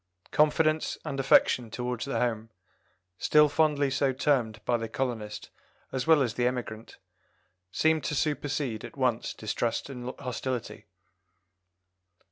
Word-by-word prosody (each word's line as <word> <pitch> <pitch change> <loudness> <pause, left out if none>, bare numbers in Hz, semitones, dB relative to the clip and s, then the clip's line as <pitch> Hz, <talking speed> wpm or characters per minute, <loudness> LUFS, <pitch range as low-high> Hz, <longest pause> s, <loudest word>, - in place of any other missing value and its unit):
Confidence 155 +1 +2
and 140 -3 -3
affection 125 -3 +4
towards 125 +1 -3
the 140 - -2
home, 115 -2 -1 0.7
still 150 0 +5
fondly 145 -2 +2
so 135 0 +2
termed 125 -5 +1
by 120 - +2
the 115 -1 -3
colonist 110 -4 -4 0.4
as 130 +1 -3
well 160 -3 +6
as 120 -4 -2
the 120 +1 +1
emigrant, 120 -3 -5 0.7
seem 160 - +2
to 140 +3 -2
supersede 145 -6 -1
at - - -10
once 125 -3 0
distrust 115 +4 -2
and 125 -1 -6
hostility. 125 -2 -4
130 Hz, 125 wpm, -28 LUFS, 115-145 Hz, 0.7 s, well